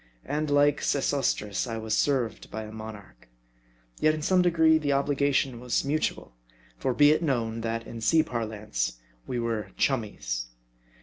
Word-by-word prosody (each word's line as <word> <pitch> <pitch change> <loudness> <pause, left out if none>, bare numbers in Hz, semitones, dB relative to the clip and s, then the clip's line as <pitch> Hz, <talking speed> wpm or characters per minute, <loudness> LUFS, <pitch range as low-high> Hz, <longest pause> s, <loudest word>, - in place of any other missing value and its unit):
And 155 0 -2
like 145 0 +3
Sesostris 135 -7 0
I 115 -1 -3
was 110 -1 -1
served 130 -5 0
by 110 +1 -5
a 105 - -9
monarch. 110 - -10 0.7
Yet 155 0 +3
in 155 - -5
some 185 +2 +4
degree 160 -2 +4
the 150 -2 -2
obliga 140 0 +2
tion 130 -3 0
was 125 +2 -1
mutual. 150 - -1 0.4
For 125 - -1
be 145 +3 +6
it 155 - +2
known 115 -7 -1
that, 115 0 -3
in 115 0 -8
sea 155 +8 +4
parlance, 105 - -3 0.3
we 125 - -2
were 115 -4 -2
chummies. - - -1
120 Hz, 160 wpm, -27 LUFS, 110-145 Hz, 0.7 s, be